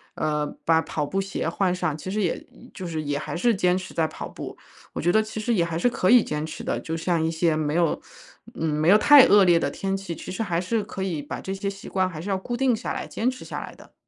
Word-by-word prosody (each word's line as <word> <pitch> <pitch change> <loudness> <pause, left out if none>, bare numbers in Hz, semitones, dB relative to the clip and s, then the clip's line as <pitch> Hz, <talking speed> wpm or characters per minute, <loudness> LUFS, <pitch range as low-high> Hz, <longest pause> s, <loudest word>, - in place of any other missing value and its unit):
呃， 150 -1 0 0.2
把 165 0 +4
跑 155 -2 -3
步 195 +6 -2
鞋 195 0 -3
换 185 -3 +1
上， 180 -5 -2
其 185 - -7
实 210 +1 -1
也 175 - -1 0.3
就 185 - -7
是 160 -2 -3
也 145 -1 -2
还 150 - -5
是 235 +5 +3
坚 180 -1 +2
持 185 - -7
在 160 - +1
跑 155 - -7
步。 - - -8 0.4
我 - - -3
觉 175 +2 +3
得 220 - +5
其 220 0 -6
实 230 +2 0
也 180 - +3
还 165 -1 -3
是 245 - +3
可 185 -6 0
以 245 -1 +7
坚 150 +1 -3
持 160 - -7
的， - - -1
就 160 - -4
像 165 -1 0
一 160 - 0
些 165 -1 +1
没 155 -1 -1
有 170 -2 +1 0.5
嗯， 160 -1 -1
没 150 +2 +1
有 205 - +8
太 285 +3 +8
恶 205 -2 +6
劣 175 -1 +5
的 140 -3 0
天 195 0 -2
气， 195 -3 -5
其 - - -9
实 205 +5 -2
还 170 -4 -1
是 210 +4 -1
可 190 -1 -5
以 165 -6 -2
把 145 - -6
这 190 - -5
些 200 +1 -3
习 195 0 -9
惯 185 -1 0
还 155 -3 -8
是 200 - -6
要 190 - +1
固 240 +5 -4
定 260 -2 +3
下 - - -4
来， - - -4
坚 250 +3 -1
持 255 - -10
下 - - -5
来 - - -8
的。 - - -18
180 Hz, 305 characters per minute, -25 LUFS, 160-200 Hz, 0.5 s, 有